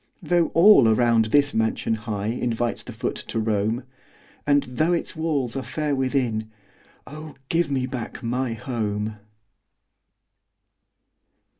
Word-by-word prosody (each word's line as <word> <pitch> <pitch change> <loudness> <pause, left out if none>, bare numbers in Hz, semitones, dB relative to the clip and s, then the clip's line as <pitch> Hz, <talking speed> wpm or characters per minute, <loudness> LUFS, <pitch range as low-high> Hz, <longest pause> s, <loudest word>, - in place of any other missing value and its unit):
Though 175 -2 +2
all 170 - +7
around 115 0 +3
this 145 +6 +3
mansion 110 0 0
high 105 -2 -4
Invites 120 0 -1
the - - -9
foot - - -3
to - - -4
roam, 110 +2 0 0.6
And 145 -1 +4
though 155 +8 0
its 170 - -2
halls 150 -7 -2
are 135 - -2
fair 150 +1 -2
within 125 -5 -1 0.6
Oh, 155 +2 -10
give 165 -2 +1
me 130 -2 0
back 125 -2 -6
my 125 +1 -1
HOME! 110 -3 -3
125 Hz, 125 wpm, -24 LUFS, 110-145 Hz, 0.6 s, all